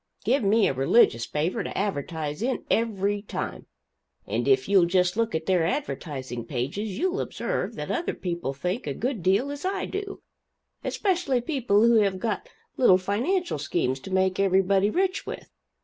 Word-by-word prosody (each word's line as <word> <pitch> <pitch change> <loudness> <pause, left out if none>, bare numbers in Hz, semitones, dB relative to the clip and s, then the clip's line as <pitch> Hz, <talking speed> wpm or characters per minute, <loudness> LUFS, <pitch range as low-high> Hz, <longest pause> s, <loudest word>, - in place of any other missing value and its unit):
Give 260 +6 +3
me 205 +1 +4
a - - 0
religious 130 - +3
paper 155 +4 -1
to - - -5
advertise 160 -4 -3
in, 255 +2 -1
every 205 -3 +1
time; 205 - -5 0.6
and - - -2
if 400 0 +3
you'll 190 -4 +5
just 180 +1 +2
look 225 -4 0
at 160 0 -2
their 185 -3 +2
advertising 145 - -3
pages, 145 - -3
you'll 370 +4 0
observe - - -3
that - - -4
other 345 0 -1
people 170 -6 -3
think 180 - -3
a - - -2
good 250 -5 -2
deal 200 +11 +2
as 285 0 -7
I 385 +1 -1
do 400 0 -6 0.6
especially 355 - 0
people 240 -6 +1
who 235 0 +5
have 200 -3 +2
got 230 - -3 0.3
little 195 -8 +6
financial 240 - -1
schemes 135 -3 -1
to 160 - -10
make 190 0 +1
everybody 195 +1 +3
rich 370 - 0
with. - - -7
200 Hz, 165 wpm, -26 LUFS, 175-260 Hz, 0.6 s, little